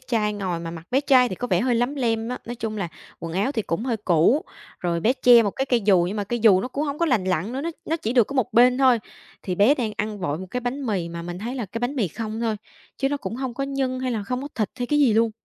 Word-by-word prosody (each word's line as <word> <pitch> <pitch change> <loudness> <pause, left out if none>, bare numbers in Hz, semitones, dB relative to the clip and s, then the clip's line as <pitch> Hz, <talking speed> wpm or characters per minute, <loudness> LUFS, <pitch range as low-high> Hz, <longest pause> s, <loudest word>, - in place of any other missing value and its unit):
trai 225 -5 0
ngồi, 185 -5 -3
mà 165 0 -5
mặt 165 0 -9
bé 265 - +3
trai 260 -3 +4
thì 185 - -4
có 245 - -4
vẻ - - +2
hơi 250 -1 +1
lấm 245 +4 0
lem 230 -4 -1
á, 250 - -4
nói 240 - -5
chung 220 -2 -4
là 195 -4 -2 0.3
quần 165 0 -5
áo 200 +10 0
thì 225 -6 -1
cũng 185 +7 -3
hơi 240 -4 0
cũ, 195 - +3 0.4
rồi 170 -1 -1
bé 230 +8 +3
che 245 -3 +6
một 205 - 0
cái 270 +6 -3
cây 245 -3 +2
dù, 195 -4 +4
nhưng 200 - -4
mà 205 - -1
cây 240 +4 -2
dù 200 -4 +6
nó 250 - -4
cũng 285 +4 -2
hông 285 0 -3
có 335 - +2
lành 235 -10 +2
lặn 185 +3 -1
nữa, 265 - -3
nó 335 +3 -2
nó 325 - -1
chỉ 230 -6 -3
được 240 -5 +4
có 280 - -7
một 250 -2 0
bên 250 +3 +5
thôi. 255 -3 +5 0.4
Thì 185 - -2
bé 210 +10 +5
đang 230 -6 -2
ăn 210 0 -3
vội 155 -4 -2
một 185 - -7
cái 250 - -2
bánh 255 +3 -3
mì, 190 -6 -1
mà 170 0 -6
mình 175 +1 -6
thấy 235 +6 -4
là 240 -5 -3
cái 215 +5 -5
bánh 245 +4 -2
mì 210 -7 +1
không 220 +5 -5
thôi, 225 -2 0 0.4
chứ 270 - 0
nó 285 - -1
cũng 235 - -5
hông 260 -2 -4
có 275 - -2
nhân 270 -2 -2
hay 255 -1 -1
là 220 - -2
không 250 +5 -3
có 285 - -5
thịt 215 -3 -1
hay 245 - -2
cái 295 +3 +1
gì 265 -7 +4
luôn. 225 +1 +3
230 Hz, 315 wpm, -24 LUFS, 200-255 Hz, 0.4 s, che